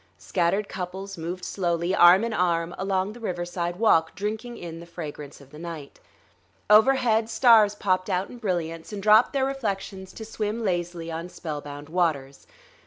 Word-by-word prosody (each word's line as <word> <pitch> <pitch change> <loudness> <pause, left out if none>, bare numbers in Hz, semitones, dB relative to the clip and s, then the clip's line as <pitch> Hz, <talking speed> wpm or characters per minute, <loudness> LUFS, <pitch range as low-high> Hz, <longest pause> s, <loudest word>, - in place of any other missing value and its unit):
Scattered 195 +3 0
couples 190 +1 -6
moved 175 +2 -5
slowly, 175 -1 -1
arm 180 +3 +7
in 230 -1 -2
arm, 170 -3 0
along 190 +1 -1
the 240 - -12
riverside 175 -4 -3
walk, 170 -6 +3
drinking 220 +4 -4
in 165 -1 -8
the 170 - -11
fragrance 150 -4 -8
of 140 -1 -17
the 150 - -11
night. 165 -4 -8 0.7
Overhead 225 0 +4
stars 220 -3 +5
popped 185 -1 0
out 185 0 0
in 245 - -11
brilliance 170 -5 -3
and 200 -2 -6
dropped 215 +3 +6
their 270 -1 +1
reflections 195 -7 -4
to 220 - -8
swim 220 +1 -3
lazily 175 -2 -2
on 165 +2 -5
spellbound 145 -4 -7
waters.... 155 -5 -1
185 Hz, 160 wpm, -25 LUFS, 170-210 Hz, 0.7 s, arm